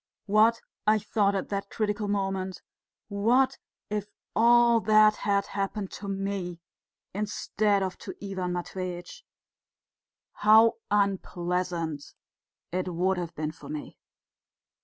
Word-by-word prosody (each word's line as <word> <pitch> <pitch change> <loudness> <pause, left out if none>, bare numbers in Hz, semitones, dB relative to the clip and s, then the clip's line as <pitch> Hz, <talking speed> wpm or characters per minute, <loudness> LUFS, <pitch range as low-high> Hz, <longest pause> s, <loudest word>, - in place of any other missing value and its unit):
"What," 220 +3 +4 0.3
I 215 0 +6
thought 205 -1 +1
at 195 - -3
that 200 0 -3
critical 210 -1 -1
moment, 195 -2 -2 0.4
"what 245 +6 +2 0.3
if 210 -1 -3 0.3
all 235 0 +6
that 215 0 +5
had 200 -1 +1
happened 195 0 -3
to 200 - -7
me 195 -3 -3 0.5
instead 205 0 0
of 185 -1 -4
to - - -8
Ivan 190 -3 -3
Matveitch 180 - -5 1.1
how 220 +2 +5
unpleasant 180 -5 -1 0.6
it 185 +1 -2
would 180 +2 +1
have 170 -1 -5
been 155 0 -2
for 160 - -13
me!" 150 -1 -7
200 Hz, 115 wpm, -28 LUFS, 185-215 Hz, 1.1 s, I